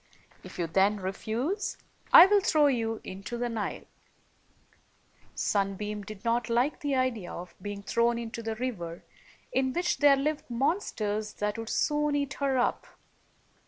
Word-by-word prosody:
If - - -11
you 175 - 0
then 195 +5 +2
refuse, 225 - -3 0.3
I 340 - +11
will 405 +1 +4
throw 310 -5 +3
you 225 -5 0
into 195 +6 -6
the 240 0 -1
Nile/' 225 -3 -4 1.5
Sunbeam 205 +1 -1
did 210 +1 -10
not 235 +1 +1
like 245 +6 +1
the 285 -2 -1
idea 250 -8 -1
of 175 +1 -8
being 205 +1 -6
thrown 235 +3 +1
into 230 0 -5
the 225 -1 -3
river, 190 -9 -5 0.5
in 260 0 +1
which 355 +1 0
there 290 -1 +7
lived 300 +1 -2
monsters 225 - -1
that 210 +2 -2
102 - - -2
would 225 - -7
soon 295 -1 +1
eat 280 -1 -1
her 275 -2 0
up. 245 - 0
235 Hz, 155 wpm, -29 LUFS, 210-275 Hz, 1.5 s, I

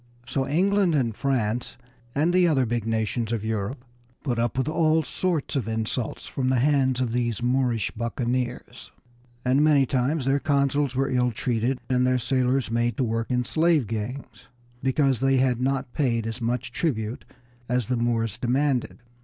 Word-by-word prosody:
So 135 +1 -1
England 190 +2 +2
and 120 -6 0
France, 120 -3 -1 0.4
and 160 +5 +2
the 180 -1 +5
other 135 -6 +2
big 115 -1 -2
nations 110 +1 -1
of 110 -2 -2
Europe, 110 +4 -3 0.4
put 120 -5 -1
up 120 +1 -1
with 130 +1 0
all 160 0 +2
sorts 160 +1 -2
of 125 -6 -1
insults 110 +1 -3
at 130 -1 +1
the 130 - +2
hands 130 -1 +2
of 125 -3 0
these 120 -2 -1
Moorish 125 -4 +1
buccaneers, 120 +1 -3 0.5
and 130 +3 +3
many 145 -3 +5
times 130 +3 0
their 135 +1 +2
consuls 140 -2 +1
were 135 +1 0
ill 125 -1 +2
treated 120 +2 -1
and 125 -1 +2
their 130 0 +3
sailors 130 0 0
made 120 +1 0
to 130 - +1
work 115 -1 -1
in 125 -1 0
slave 160 -3 +2
gangs 115 +5 -6 0.3
because 135 -1 +2
they 135 0 +3
had 125 -2 +2
not 135 -1 -1
paid 115 -6 0
as 115 +2 -5
much 120 +1 -2
tribute 120 -4 -2 0.5
as 125 -1 +1
the 125 - -1
Moors 115 -2 -1
demanded. 130 +1 0
125 Hz, 170 wpm, -25 LUFS, 120-140 Hz, 0.5 s, the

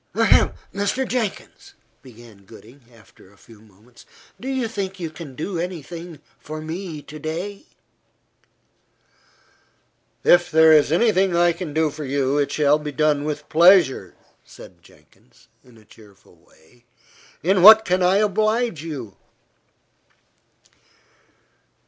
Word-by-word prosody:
"Ahem! - - +3 0.2
Mr. 205 +6 -2
Jenkins," 230 -5 -5 0.3
began 115 -5 -17
Gooding, 115 +5 -17
after 110 -4 -21
a 100 - -24
few 105 +3 -19
moments, 110 +3 -22 0.3
"do 255 - -9
you 260 -3 -2
think 195 -3 -6
you 165 -3 -5
can 155 -5 -11
do 170 +4 -5
any 175 -3 -5
thing 170 -1 -10 0.2
for 155 +1 -8
me 160 -1 -7
to 155 +2 -11
day?" 180 - -6 2.6
"If 175 0 +4
there 160 0 +5
is 150 -1 +3
any 220 +7 +3
thing 190 -2 0
I 175 0 +3
can 170 -2 -7
do 155 0 0
for 150 - -8
you, 140 +1 -1
it 145 - -1
shall 150 0 +2
be 150 -1 -6
done 150 +1 0
with 150 0 -5
pleasure," 165 - +3 0.3
said 85 -1 -16
Jenkins, 95 +10 -25
in 125 -3 -21
a 110 - -21
cheerful 105 -3 -21
way. 80 +10 -26 0.6
"In 185 +2 +2
what 220 +3 +9
can 185 0 0
I 180 +1 +3
oblige 215 -2 0
you?" 140 -11 -8
155 Hz, 135 wpm, -21 LUFS, 130-185 Hz, 2.6 s, what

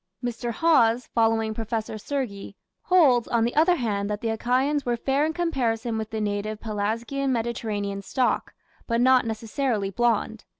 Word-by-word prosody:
Mr. 240 0 -3
Hawes, 240 -5 +3
following 225 -1 +2
Professor 220 0 -3
Sergi, 210 -6 -4 0.3
holds, 280 -10 +4
on 235 -1 +1
the 235 - 0
other 330 +4 +4
hand, 205 -7 -2
that 210 -1 -2
the 230 - -1
Achaeans 255 +6 +1
were 240 -1 -1
"fair 275 +5 +1
in - - -1
comparison 245 -9 -1
with 220 -1 -4
the 220 -1 -4
native 210 0 -2
(Pelasgian 225 +6 -2
Mediterranean) 220 -4 -2
stock, 250 +5 0 0.4
but 230 -1 +1
not 255 -1 +4
necessarily 220 -2 -2
blonde". 225 -1 0
230 Hz, 155 wpm, -25 LUFS, 220-260 Hz, 0.4 s, holds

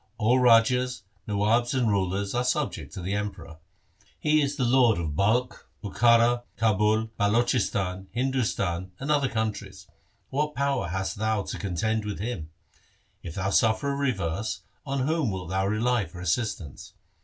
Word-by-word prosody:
All 120 +3 +3
rajas, 125 0 +4 0.2
nawabs, 110 +5 +1
and 125 -3 +2
rulers, 100 -1 0
are 120 +1 +1
subject 125 - -2
to 95 - -6
the 95 +3 -2
Emperor. 100 -6 -5 0.6
He 155 0 +3
is 140 0 -1
the 140 - -1
lord 120 -2 +4
of 80 -4 -3
Balkh, 115 +8 0 0.2
Bukhara, 115 +3 +4 0.2
Kabul, 110 +1 +2
Balochistan, 100 -4 +1
Hindustan 105 -8 -1
and 140 +3 -2
other 140 -3 +2
countries. 100 -3 -4 0.5
What 150 +1 -1
power 140 -6 0
hast 95 +3 -3
thou 110 -1 0
to - - -6
contend 105 +4 -1
with 105 -1 -4
him? 100 -8 -4 0.7
If 80 - -8
thou 95 0 -1
suffer 110 +6 +2
a - - -2
reverse, 110 - -2 0.3
on 135 0 -1
whom 155 -4 +1
wilt 95 -2 -5
thou 95 +1 +1
rely 110 +1 +1
for 85 +2 -11
assistance 90 - -3
110 Hz, 150 wpm, -26 LUFS, 95-125 Hz, 0.7 s, rajas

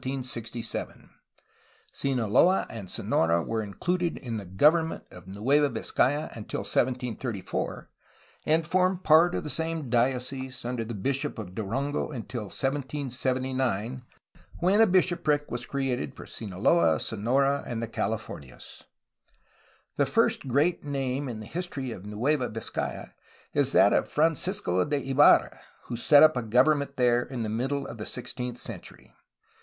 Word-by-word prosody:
Sinaloa 120 -3 -5 0.8
• 135 - +2
and 100 -5 -8
Sonora 85 +1 +1
were 115 +4 -2
included 175 - -2
in 115 -3 -5
the 100 -3 -7
government 155 - +3
of 90 0 -13
Nueva 135 +10 +2
Vizcaya 135 +5 0
until 110 -3 -5
1734, 120 0 -2 0.6
and 160 +1 +3
formed 185 +2 +1
part 165 +3 +5
of - - -2
the 150 - -5
same 160 -5 -2
diocese 130 +1 -1
under 120 -1 -2
the 115 0 -6
bishop 135 +7 -2
of 100 -5 -7
Durango 125 +9 -2
until 120 -4 -5
1779, 130 -2 -2 0.6
when 190 +5 +3
a 225 - +7
bishopric 175 -5 +1
was 120 0 -4
created 135 -1 -2
for - - -9
Sinaloa, 100 - +1
Sonora, 135 +6 +1
and 115 -1 -3
the - - -3
CaUfornias. 110 - -6 1.1
The - - +2
first - - +1
great 145 +7 +1
name 135 -1 -2
in 110 -3 -6
the - - -8
history 145 - -4
of 100 -2 -8
Nueva 125 +6 0
Vizcaya 110 +1 -5 0.4
is - - +2
that - - +6
of - - +2
Francisco 155 - +1
de 140 -2 -2
Ibarra, 145 +2 +5 0.2
who 120 - -5
set 145 +5 +6
up 155 -2 +6
a 125 - 0
government 140 +5 +2
there 120 -1 +3
in 120 -2 -5
the 110 - -3
middle 135 +6 -1
of 115 - -8
the 105 - -5
sixteenth 125 0 -5
century. - - -10
130 Hz, 140 wpm, -27 LUFS, 115-145 Hz, 1.1 s, a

